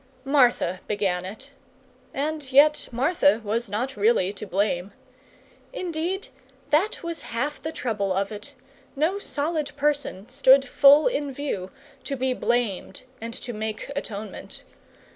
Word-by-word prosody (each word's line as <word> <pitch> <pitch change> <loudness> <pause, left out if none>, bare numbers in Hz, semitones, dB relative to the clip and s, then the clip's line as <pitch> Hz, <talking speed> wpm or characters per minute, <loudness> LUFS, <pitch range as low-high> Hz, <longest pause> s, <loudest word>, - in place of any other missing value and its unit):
Martha 245 -10 +3
began 190 -3 -1
it; 220 +9 -9 0.6
and 295 -1 -3
yet 295 +3 +5
Martha 280 0 +3
was 225 +2 -1
not 245 +7 -2
really 205 -2 +2
to 210 - -8
blame. 195 0 -1 0.8
Indeed, 360 -1 -3 0.4
that 350 +9 +2
was 335 -3 -3
half 285 +6 -3
the 315 - -4
trouble 210 -9 -2
of 195 +2 0
it 215 +7 -8 0.4
no 325 +8 +1
solid 295 -2 -2
person 285 -8 -1
stood 270 +1 +5
full 285 +4 +7
in 295 - 0
view, 255 -9 -4 0.4
to 280 - -2
be 260 0 0
blamed 235 -6 -1 0.2
and 230 +1 -5
to 240 - -6
make 215 +4 -4
atonement. 215 -4 -6
260 Hz, 130 wpm, -25 LUFS, 210-295 Hz, 0.8 s, full